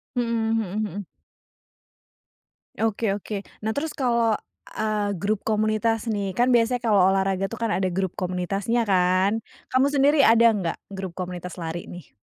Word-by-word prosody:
Mhm 245 - +1 0.3
mhm 215 -1 -1
mhm. 205 -1 -4 1.7
Oke 220 -2 0
oke. 205 0 -5 0.2
Nah, 220 - 0
terus 295 +5 -3
kalo, 235 -4 +2 0.4
eee, 210 -2 -1
grup 200 +3 -1
komunitas 215 +1 +1
nih. 195 -2 -3
Kan 245 +1 +3
biasanya 240 +1 +3
kalo 210 -3 +4
olahraga 195 0 +1
tuh 230 - -7
kan 225 - +1
ada 190 -1 +1
grup 185 0 -2
komunitasnya 195 +6 -1
kan? 190 +2 +2 0.3
Kamu 260 +2 +4
sendiri 285 +1 +3
ada 230 -2 +6
enggak 185 -6 -2 0.2
grup 190 -2 -5
komunitas 180 -1 -6
lari 170 0 -5
ini? 175 -1 -10
210 Hz, 145 wpm, -24 LUFS, 190-230 Hz, 1.7 s, ada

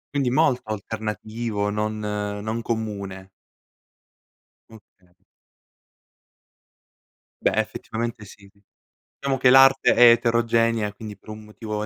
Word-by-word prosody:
Quindi 135 -3 +1
molto 130 -1 +2
alternativo, 110 0 -4
non 105 +1 -2
non 105 +1 -4
comune. 100 -5 -5 1.4
Okay. 95 -5 -20 2.3
Beh, - - +1
effettivamente 115 -1 -4
sì. 100 0 -16 0.7
Diciamo 140 -1 -2
che 130 - +5
l'arte 135 +1 +6
è 120 -1 +8
eterogenea, 115 -2 +1
quindi 105 -1 -9
per 110 - -18
un 110 0 -9
motivo 105 0 -7
o - - -3
110 Hz, 100 wpm, -23 LUFS, 105-115 Hz, 2.3 s, è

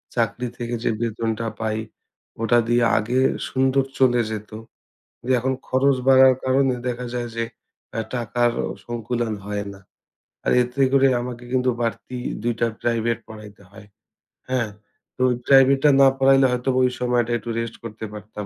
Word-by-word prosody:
চাকরি 120 +1 -1
থেকে 120 0 -3
যে - - +1
বেতনটা 115 0 -2
পাই 110 -1 -1 0.6
ওটা 115 +1 +3
দিয়ে 120 +1 +3
আগে 120 +4 0 0.3
সুন্দর 135 +1 +2 0.2
চলে 125 -2 +4
যেতো। 110 0 -6 0.8
এখন 130 +2 0
খরচ 135 +1 +2
বাড়ার 130 -1 +7
কারণে 130 0 +2
দেখা 125 0 -3
যায় 120 -1 -3
যে 115 - -1 0.5
অ্যা 115 - -2
টাকারও 120 0 0 0.2
সংকুলান 120 -1 -3
হয় 105 0 -3
না। 100 - -14 0.7
আর - - +2
এতে 125 +3 -2
করে 135 0 +5
আমাকে 125 0 -6
কিন্তু 130 0 +2
বাড়তি 120 +2 -3 0.3
২ 120 0 0
টা 115 - +3 0.2
প্রাইভেট 115 -1 0
পড়াইতে 105 -2 -12
হয়, 105 +1 -14 0.6
হ্যাঁ? 125 -4 0 0.5
তো - - -5 0.3
প্রাইভেটা 135 +1 +6
না 135 - +8
পড়াইলে 135 0 +5
হয়তোবা 125 +1 0
ওই 125 - +1
সময়টা 120 -1 +1
একটু 120 - -8
রেস্ট 115 -1 -4
করতে 110 -1 -7
পারতাম। 105 0 -8
120 Hz, 150 wpm, -22 LUFS, 115-130 Hz, 0.8 s, না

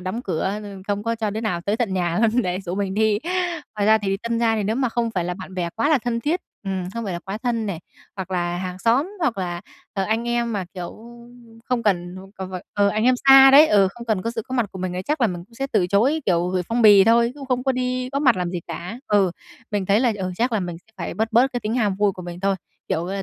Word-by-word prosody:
đóng 185 +6 -4
cửa 190 +3 -2
rồi 200 -2 -9
không 205 0 -1
có 230 +1 -1
cho 220 -2 -2
đứa 220 +2 -3
nào 180 -7 -1
tới 205 +5 -1
tận 225 -6 -1
nhà 175 -2 0
luôn 230 +2 +3
để 180 +1 -2
rủ 180 -1 -5
mình 195 -1 -2
đi. 215 -1 +2 0.6
Ngoài 205 - +1
ra 220 0 +6
thì 195 -2 -1
tân 235 +3 -2
gia 230 -1 +2
thì 210 - 0
nếu 220 +4 0
mà 260 -2 +1
không 230 0 -1
phải 180 -5 -2
là 180 0 -2
bạn 190 0 -10
bè 175 -2 -1
quá 230 - +1
là 305 -3 +4
thân 235 0 -2
thiết, 330 +7 0 0.2
ừm, 190 -2 -3
không 230 -1 -3
phải 190 - -3
là 170 - -3
quá 195 +4 -6
thân 230 -3 -1
này, 185 -5 -4 0.4
hoặc 190 -1 -5
là 175 -1 -1
hàng 180 0 -5
xóm, 255 - +2
hoặc 250 -11 0
là, 175 -2 -3 0.3
ờ, 195 - -1
anh 225 +3 -1
em, 235 -1 0
mà 200 -3 -2
kiểu, 175 -2 -5 0.7
không 245 -2 -1
cần, 180 -3 0 0.2
ờ, 190 -1 -5
c - - -12
phải 185 - -5
ờ, 205 -1 +3
anh 215 +3 0
em 255 - +5
xa 270 0 +10
đấy, 290 +3 +9
ừ, 200 -7 +4
không 235 0 -10
cần 215 -5 0
có 230 - -2
sự 225 -1 -4
có 260 - -4
mặt 240 -4 +1
của 190 - -8
mình 185 -1 -3
ấy, 180 - -3
chắc 300 +6 -2
là 235 - +5
mình 175 -3 -5
cũng 230 +4 -23
sẽ 270 +3 -3
từ 195 -5 +3
chối, 240 - +2
kiểu, 175 -1 +2
gửi 180 -1 0
phong 235 +1 +1
bì 205 -3 +8
thôi, 235 +1 +4
chứ 290 - -13
không 250 -1 0
có 265 - +2
đi 255 0 -2
góp 280 - -1
mặt 255 -7 +5
làm 180 -1 -2
gì 175 -1 -3
cả. 195 +8 -6
Ừ, 200 -3 +3 0.4
mình 205 -2 -1
thấy 200 +3 +3
là, 245 -3 +3
ừ, 185 -2 -3
chắc 240 +4 0
là 220 - +1
mình 175 -2 -4
sẽ 220 +5 -30
phải - - -5
bớt 220 +1 0
bớt 255 +4 +4
cái 245 - -2
tính 215 +2 -2
ham 210 -6 +1
vui 205 0 +2
của 180 - -9
mình 175 0 -8
thôi. 195 0 +1 0.3
Kiểu, 170 +2 -1
à, 195 +1 -3
210 Hz, 290 wpm, -22 LUFS, 185-235 Hz, 0.7 s, xa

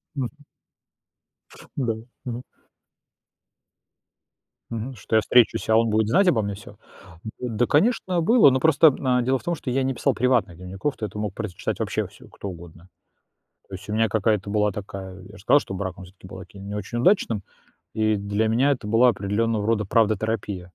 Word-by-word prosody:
Мгм. 130 -4 -2 1.5
Да. 120 -5 0 0.3
Мгм. 125 0 -5 2.3
Мгм. 115 +3 -5
Что 110 0 -2
я - - +6
встречусь, 120 0 +3
а 110 - +4
он 115 -1 +3
будет 110 0 +1
знать 185 - +4
обо 115 -9 +3
мне 100 0 -3
всё? 100 - -13 0.6
Да, 120 -1 0
конечно, 180 +1 +2
было, 215 - +6
но 130 0 +1
просто, 160 +1 +6
м, 125 -2 +1
дело 130 +1 +1
в - - -17
том, 175 - -1
что 130 - -5
я 135 +2 +1
не 130 0 -1
писал - - 0
приватных 120 -9 +1
дневников, 95 - -4
то 110 - -3
это 105 +1 -9
мог 105 -2 -3
прочитать 105 -6 -4
вообще - - -1
всё - - -17
кто 100 - -8
угодно. 85 0 -11 0.8
То 95 - -8
есть 95 - -12
у - - -2
меня 110 +1 +2
какая-то 105 -2 0
была 105 -1 +2
такая 95 -2 -8
Я 95 +2 -13
же - - -14
сказал, 145 +7 +5
что 95 - -8
брак, 95 -1 -4
он 95 - -10
всё-таки 95 0 -15
был 95 - -9
таким 100 +2 -11
не 100 - -5
очень 105 +4 -4
удачным, 120 - +2 0.5
и 110 -1 +1
для 100 +2 -1
меня 130 +6 +3
это 120 -6 -3
была 115 +3 +5
определенного 105 +1 -1
рода 110 -2 +1
правдотерапия. 105 -3 0
110 Hz, 185 wpm, -24 LUFS, 100-125 Hz, 2.3 s, я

